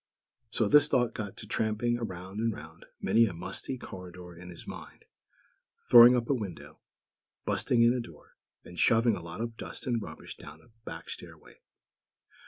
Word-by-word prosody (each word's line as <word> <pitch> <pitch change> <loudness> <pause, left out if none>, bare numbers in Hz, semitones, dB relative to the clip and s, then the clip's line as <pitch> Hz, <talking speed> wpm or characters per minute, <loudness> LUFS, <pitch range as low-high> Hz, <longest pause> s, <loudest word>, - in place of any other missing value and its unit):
So 110 -1 +1
this 150 +7 +6
thought 120 -3 +1
got 100 -3 -6
to - - -3
tramping 110 +2 0
round 95 -2 -6
and 115 0 +1
round 80 -3 -11
many 115 0 +4
a 100 - -4
musty 90 +9 -4
corridor 90 -5 -10
in 90 +1 -11
his 85 - -10
mind; - - -10 0.9
throwing 120 +1 +10
up 120 -1 -2
a - - +2
window, 100 - -6 0.7
"busting 115 -1 +2
in" 120 +1 +5
a 125 - -1
door, 85 -10 -11 0.3
and 90 - -10
shoving 115 -1 +4
a - - -6
lot 85 +5 -7
of 115 -1 -4
dust - - -5
and 120 -3 0
rubbish 80 -6 -9
down - - -11
a - - -22 0.2
back 80 0 -8
stairway. - - -10
110 Hz, 175 wpm, -30 LUFS, 90-120 Hz, 0.9 s, throwing